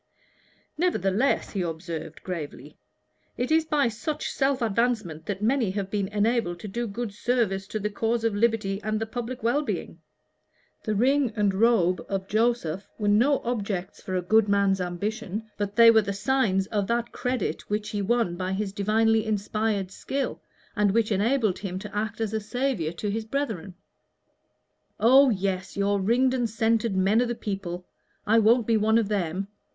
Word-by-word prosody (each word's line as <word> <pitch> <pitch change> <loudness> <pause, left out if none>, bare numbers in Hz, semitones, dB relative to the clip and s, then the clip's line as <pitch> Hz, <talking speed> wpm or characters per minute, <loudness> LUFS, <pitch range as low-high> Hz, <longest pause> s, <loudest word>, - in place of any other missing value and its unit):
"Nevertheless," 255 - +1
he 195 - -2
observed, 165 -2 -5
gravely, 150 -5 -6 0.6
"it 250 +4 -2
is 320 0 +4
by 295 -4 +2
such 285 +7 -3
self 270 -1 +1
advancement 220 -8 -1
that 205 0 -3
many 240 -2 +2
have 195 0 -3
been 200 -2 0
enabled 210 -3 0
to - - -6
do 235 +4 -3
good 220 0 -4
service 210 -4 0
to 215 - -3
the 210 0 -2
cause 225 +2 -1
of 225 -2 +1
liberty 205 -2 0
and 215 0 -2
to 225 - -2
the 220 - -21
public 245 0 -5
well 240 +6 +2
being. 300 - -4 0.9
The 215 -2 0
ring 265 +3 +2
and 205 -2 +2
the 190 - -5
robe 185 -6 +3
of 195 -1 -2
Joseph 215 -5 0
were 210 -2 0
no 245 +8 +3
objects 200 -5 -3
for 185 - -4
a 180 - 0
good 215 +3 +3
man's 200 -1 +2
ambition, 210 +4 -4
but 205 0 -3
they 230 0 +8
were 220 -1 +5
the 200 -1 -3
signs 205 -2 +1
of 205 -2 0
that 235 +1 -1
credit 250 -4 -3
which 210 0 -2
he 205 -1 -2
won 225 -3 +1
by 185 +1 -3
his 195 0 -2
divinely 220 +2 +2
inspired 210 -2 -1
skill, 270 +7 -3 0.3
and 205 -3 +2
which 230 -1 +2
enabled 215 0 +1
him 185 -2 -4
to 205 +1 -8
act 215 +1 -2
as 220 -1 -2
a 220 - 0
saviour 230 - -1
to 205 +4 -3
his 220 +2 -2
brethren." 220 - -3 1.2
"Oh, 265 +5 +6
yes, 190 -3 -2
your 200 0 +1
ringed 250 +6 +2
and 245 -3 0
scented 225 -1 +1
men 200 +5 +3
of 245 - +1
the 240 - -2
people! 190 -4 -5 0.4
I 225 +2 +4
won't 225 +2 +4
be 225 0 +3
one 220 +1 +3
of 225 -3 +1
them. 195 -2 -2
215 Hz, 180 wpm, -26 LUFS, 195-235 Hz, 1.2 s, they